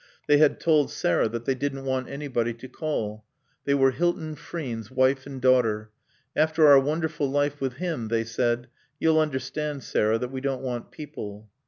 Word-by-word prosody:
They 145 0 +5
had 150 -1 +4
told 155 -4 +3
Sarah 85 +5 +1
that 115 +1 -5
they 135 - +2
didn't 135 0 -3
want 130 -1 -1
anybody 130 -5 -2
to 120 +3 -10
call. 110 -9 -3 0.4
They 140 - +3
were 135 -1 +4
Hilton 160 +1 -1
Frean's 125 -8 -6
wife 130 +1 +2
and 135 -2 -7
daughter. 115 -4 +2 0.4
"After 155 +1 +4
our 140 -1 +9
wonderful 150 0 -1
life 145 +1 0
with 135 -2 -1
him," 155 -5 -3
they 115 0 0
said, 120 +1 -1 0.3
"you'll 160 -1 +4
understand, 145 0 -2
Sarah, 110 +1 +1
that 125 +2 -4
we 130 -1 -5
don't 135 -1 -2
want 125 -2 -4
people." 110 -9 -9
135 Hz, 175 wpm, -26 LUFS, 120-150 Hz, 0.4 s, our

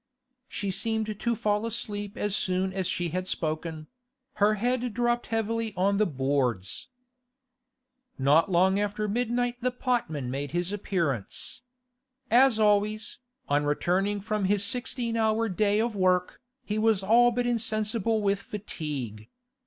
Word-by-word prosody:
She 200 -1 -3
seemed 215 +1 -2
to 235 -1 0
fall 210 -2 0
asleep 210 -3 -4
as 205 -1 0
soon 185 0 0
as 190 -2 -1
she 175 -1 -1
had 185 +3 -3
spoken; 155 -1 -3 0.6
her 210 +1 +5
head 245 +1 -1
dropped 240 0 +1
heavily 225 -1 -1
on 195 +2 +2
the 215 0 +3
boards. 130 - -1 1.3
Not 145 +7 +4
long 190 +3 +4
after 205 +1 -1
midnight 245 +2 0
the 255 - +2
potman 235 - -2
made 140 +3 -4
his 175 +2 -1
appearance. 175 - -3 0.7
As 250 0 +6
always, 215 0 +1 0.3
on 145 +1 +2
returning 185 +7 +1
from 210 -1 -1
his 200 +1 +2
sixteen 245 -1 -2
hour 220 0 +2
day 205 +1 +1
of 230 -1 0
work, 185 +2 +1 0.2
he 210 +1 -1
was 215 -3 +2
all 235 +4 +6
but 245 +1 -1
insensible 220 -2 0
with 200 0 +2
fatigue. 145 - -6
205 Hz, 135 wpm, -27 LUFS, 180-225 Hz, 1.3 s, As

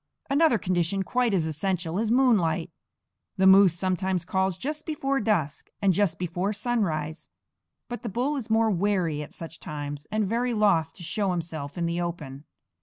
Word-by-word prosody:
Another 285 -3 +4
condition 185 0 0
quite 250 +3 +1
as 180 -5 +1
essential 170 +2 -2
is 220 0 0
moonlight. 200 -10 +2 0.7
The 190 - +3
moose 190 -2 +7
sometimes 185 -1 -1
calls 190 -1 0
just 300 +3 -4
before 275 -3 -1
dusk 170 -10 -1
and 195 -2 +3
just 175 -3 +1
before 180 +4 -2
sunrise; 185 -9 -2 0.6
but 240 -3 -6
the 235 - -4
bull 250 +8 -1
is 250 -5 -5
more 225 0 +3
wary 180 -5 0
at 150 - -8
such 165 -1 -9
times, 145 -1 -6
and 215 0 +1
very 240 +3 0
loth 195 -7 +3
to 175 - -11
show 200 +4 -1
himself 160 -5 -4
in 170 - 0
the 170 +1 -1
open. 150 -5 -5
190 Hz, 170 wpm, -26 LUFS, 165-220 Hz, 0.7 s, moose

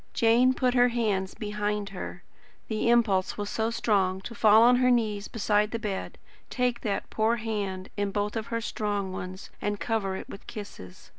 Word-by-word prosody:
Jane 240 +3 +4
put 250 -1 +1
her 245 -1 +5
hands 210 -6 -1
behind 210 -1 -2
her. 180 -2 -7 0.5
The 220 +1 0
impulse 215 -6 +2
was 205 -1 -3
so 220 0 0
strong 195 -5 +1
to 235 - -7
fall 220 -1 +6
on 245 +1 +6
her 250 0 +3
knees 215 -4 +1
beside 210 -1 +1
the 230 - -3
bed, 205 -4 -4 0.3
take 250 -2 0
that 205 -3 -3
poor 220 +2 +2
hand 205 -5 -3
in 205 -1 -1
both 205 +1 -1
her 230 +1 -3
strong 205 -3 -2
ones, 185 +1 -7
and 205 -1 -2
cover 210 -4 -1
it - - -7
with 200 - -11
kisses. 200 - -9
210 Hz, 175 wpm, -27 LUFS, 200-230 Hz, 0.5 s, fall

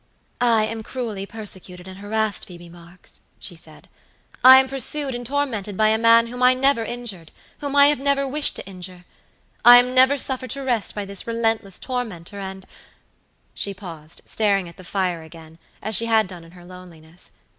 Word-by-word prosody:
"I 230 -3 +3
am 225 +1 -5
cruelly 220 -5 -5
persecuted 190 -4 -6
and 190 0 -10
harassed, 215 +1 -2
Phoebe 175 -1 -12
Marks," 175 +1 -13 0.2
she - - -9
said. - - -13 0.6
"I 260 +1 +10
am 265 0 +4
pursued 270 +1 -1
and 245 0 -5
tormented 235 -7 -3
by 215 0 +4
a 220 0 +2
man 230 0 +5
whom 245 +2 -8
I 250 0 +5
never 270 -2 +2
injured, 225 -9 -4 0.3
whom 285 -1 -4
I 285 0 +7
have 290 -2 +3
never 275 0 0
wished 290 +2 +1
to - - -5
injure. 180 -2 -7 0.6
I 245 0 +10
am 250 +1 +3
never 260 +2 +5
suffered 260 -1 -1
to 275 - -5
rest 240 -5 -1
by 205 -1 -4
this 200 +1 -4
relentless 225 -4 -1
tormentor, 210 -7 -5
and" 190 -1 -7 0.9
She 200 -1 -3
paused, 165 -5 -9
staring 200 -4 0
at 170 - -14
the 185 - -12
fire 180 -2 -2
again, 160 0 -14 0.2
as 215 0 0
she 230 - +4
had 220 -1 +3
done 180 -2 -10
in 165 +1 -17
her 175 -1 -15
loneliness. 175 -2 -11
215 Hz, 185 wpm, -22 LUFS, 185-250 Hz, 0.9 s, I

